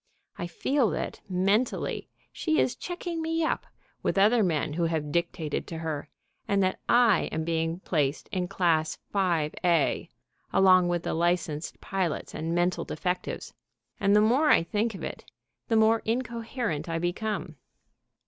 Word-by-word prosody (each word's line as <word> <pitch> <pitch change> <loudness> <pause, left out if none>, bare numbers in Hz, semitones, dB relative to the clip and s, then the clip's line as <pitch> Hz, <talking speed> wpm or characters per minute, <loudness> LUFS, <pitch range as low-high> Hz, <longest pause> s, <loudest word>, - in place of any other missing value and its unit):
I 175 - -4
feel 250 - +1
that, - - -4
mentally, 195 +6 0 0.2
she 315 -2 0
is 250 - +2
checking 350 -2 -4
me 325 0 0
up 315 - -1 0.3
with - - -1
other 215 +4 +5
men 155 -6 0
who 170 +2 0
have 160 -3 -1
dictated 170 -2 -2
to 165 - -5
her, 155 -2 -4 0.4
and 200 -1 +2
that 185 - 0
I 235 -5 +4
am 160 - -2
being 165 +1 -1
placed 150 -6 0
in 180 -1 -1
Class 165 -4 +1 0.2
5a, 170 -3 +1 0.4
along 185 -2 +6
with 175 -1 0
the - - -2
licensed 170 -2 -1
pilots 185 -5 -2
and 165 +2 -2
mental 175 +1 +1
defectives, 180 -1 -3 0.5
and 200 0 +4
the 210 - +6
more 255 +8 +4
I - - +6
think 210 +5 -1
of - - -8
it - - -5 0.4
the 225 - +1
more 220 +1 +4
incoherent 230 - -2
I 165 - -1
become. 180 +6 -3
180 Hz, 150 wpm, -28 LUFS, 165-220 Hz, 0.5 s, along